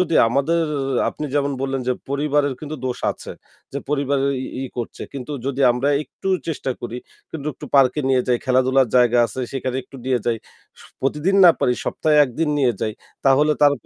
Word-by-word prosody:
যদি 175 Hz, -3 st, +1 dB
আমাদের 160 Hz, +7 st, +1 dB, 0.4 s
আপনি 150 Hz, -, -5 dB
যেমন 140 Hz, -1 st, +1 dB
বললেন 135 Hz, -1 st, -1 dB
যে, -, -, +3 dB, 0.2 s
"পরিবারের 145 Hz, 0 st, +1 dB
কিন্তু 155 Hz, 0 st, -6 dB
দোষ 125 Hz, -1 st, -2 dB
আছে।" -, -, -9 dB, 0.4 s
যে 140 Hz, -, -2 dB
পরিবারের 140 Hz, -1 st, +1 dB
ই -, -, -6 dB, 0.2 s
ই -, -, -3 dB
করছে, 120 Hz, -2 st, -5 dB
কিন্তু 140 Hz, +1 st, -6 dB
যদি 140 Hz, 0 st, -2 dB
আমরা 125 Hz, +4 st, 0 dB
একটু 190 Hz, -, -7 dB, 0.2 s
চেষ্টা 145 Hz, -4 st, -2 dB
করি 120 Hz, 0 st, -5 dB, 0.3 s
কিন্তু 155 Hz, -2 st, -6 dB
একটু -, -, -9 dB
পার্কে 135 Hz, +1 st, +4 dB
নিয়ে 130 Hz, -1 st, +3 dB
যাই, 120 Hz, -, +3 dB
খেলাধুলার 130 Hz, 0 st, +3 dB
জায়গা 120 Hz, -1 st, +4 dB
আছে 130 Hz, +4 st, -6 dB
সেখানে 130 Hz, -1 st, -2 dB
একটু 135 Hz, +2 st, -14 dB
নিয়ে 130 Hz, -2 st, +2 dB
যাই। 120 Hz, -1 st, +2 dB, 0.4 s
স -, -, -13 dB, 0.2 s
প্রতিদিন 150 Hz, +8 st, +1 dB
না 175 Hz, -, +10 dB
পারি, 125 Hz, -, +3 dB
সপ্তাহে 155 Hz, -1 st, +1 dB
একদিন 145 Hz, +5 st, -2 dB
নিয়ে 130 Hz, -4 st, +3 dB
যাই 110 Hz, -, -1 dB, 0.3 s
তাহলে 145 Hz, +3 st, +4 dB
তার 145 Hz, -, +7 dB
135 Hz, 185 wpm, -21 LUFS, 130-145 Hz, 0.4 s, না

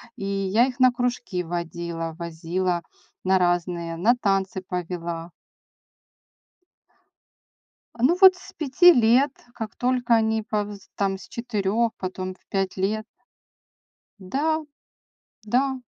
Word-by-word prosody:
И 200 Hz, -5 st, -6 dB
я 200 Hz, +5 st, +2 dB
их 255 Hz, 0 st, -7 dB
на 255 Hz, -1 st, +6 dB
кружки 245 Hz, -6 st, -2 dB
водила, 170 Hz, -1 st, -4 dB
возила 170 Hz, +1 st, -2 dB, 0.4 s
на 190 Hz, 0 st, +3 dB
разные, 175 Hz, -1 st, 0 dB
на 230 Hz, +8 st, +4 dB
танцы 195 Hz, -4 st, 0 dB
повела. 170 Hz, -2 st, -4 dB, 2.7 s
А -, -, -5 dB
ну 335 Hz, +8 st, +4 dB
вот 380 Hz, -1 st, +9 dB
с 370 Hz, -, -14 dB
5 320 Hz, +4 st, +6 dB
лет, 245 Hz, +3 st, +4 dB, 0.2 s
как 220 Hz, -1 st, -6 dB
только 245 Hz, -2 st, +2 dB
они 220 Hz, 0 st, +1 dB
повз 205 Hz, -2 st, -4 dB
там 195 Hz, -1 st, 0 dB
с -, -, -13 dB
4, 230 Hz, -1 st, -1 dB
потом 185 Hz, 0 st, -5 dB
в -, -, -32 dB
5 195 Hz, -1 st, -1 dB
лет. 215 Hz, +3 st, -1 dB, 1.1 s
Да, 295 Hz, +11 st, -1 dB, 0.8 s
да. 260 Hz, +4 st, +1 dB
200 Hz, 115 wpm, -24 LUFS, 180-245 Hz, 2.7 s, вот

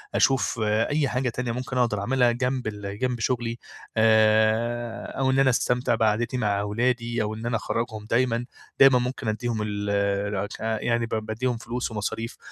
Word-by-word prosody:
أشوف 130 Hz, -3 st, +2 dB
أي 115 Hz, +8 st, +1 dB
حاجة 125 Hz, 0 st, -1 dB
تانية 120 Hz, 0 st, -3 dB
ممكن 125 Hz, +1 st, -4 dB
أقدر 115 Hz, -5 st, +1 dB
أعملها 125 Hz, +2 st, +3 dB
جنب 125 Hz, 0 st, -1 dB
ال 105 Hz, -1 st, -5 dB
جنب 125 Hz, -2 st, -1 dB
شغلي 115 Hz, 0 st, -1 dB, 0.4 s
آآ، 110 Hz, +2 st, +3 dB
أو 130 Hz, -1 st, +2 dB
إن 135 Hz, -, +2 dB
أنا 135 Hz, -, +5 dB
أستمتع 125 Hz, -1 st, +1 dB
بقعدتي 115 Hz, +3 st, +1 dB
مع 100 Hz, -4 st, +1 dB
أولادي، 115 Hz, +2 st, 0 dB
أو 105 Hz, -, -3 dB
إن 110 Hz, +2 st, -7 dB
أنا 120 Hz, -1 st, 0 dB
أخرَّجهم 110 Hz, -1 st, -3 dB
دايمًا، 120 Hz, 0 st, +1 dB, 0.3 s
دايمًا 135 Hz, -2 st, +7 dB
ممكن 125 Hz, -1 st, -3 dB
ادّيهم 110 Hz, +1 st, -1 dB
ال 105 Hz, -1 st, -3 dB, 1.0 s
يعني 115 Hz, 0 st, +1 dB
ب -, -, -11 dB
بادّيهم 110 Hz, +3 st, -2 dB
فلوس 120 Hz, +1 st, -4 dB
ومصاريف 110 Hz, +2 st, -4 dB
115 Hz, 160 wpm, -25 LUFS, 110-125 Hz, 1.0 s, دايمًا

